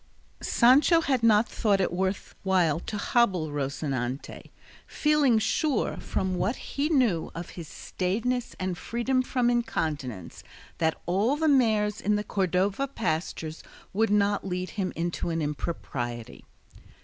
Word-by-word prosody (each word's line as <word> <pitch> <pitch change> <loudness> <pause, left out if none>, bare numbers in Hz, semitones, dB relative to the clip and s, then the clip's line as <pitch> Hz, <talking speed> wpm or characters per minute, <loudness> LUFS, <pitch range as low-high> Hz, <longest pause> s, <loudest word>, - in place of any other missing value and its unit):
Sancho 280 +7 +5
had 265 -6 +1
not 225 -1 +5
thought 205 -3 +1
it 185 -2 0
worth 190 +2 -2
while 180 -5 +2
to 210 +4 -5
hobble 195 -8 +2
Rocinante, 135 -2 -3 0.4
feeling 300 -6 +3
sure, 275 +6 0
from 190 -1 -2
what 210 +8 0
he 285 +2 -3
knew 245 - +2
of 170 +1 -6
his 170 -3 -8
staidness 230 +11 -2
and 185 -2 -3
freedom 255 +2 0
from 250 -1 0
incontinence, 150 - -3 0.4
that 160 -1 +1
all 200 +10 +2
the 315 +1 0
mares 215 -7 +3
in 210 +1 +2
the 210 - -1
Cordova 195 +5 0
pastures 160 - -3 0.3
would 225 +3 +2
not 205 0 +2
lead 185 -1 -3
him 190 -3 -2
into 170 +1 -2
an 165 0 -1
impropriety. 130 -6 -4
195 Hz, 135 wpm, -27 LUFS, 165-240 Hz, 0.4 s, Sancho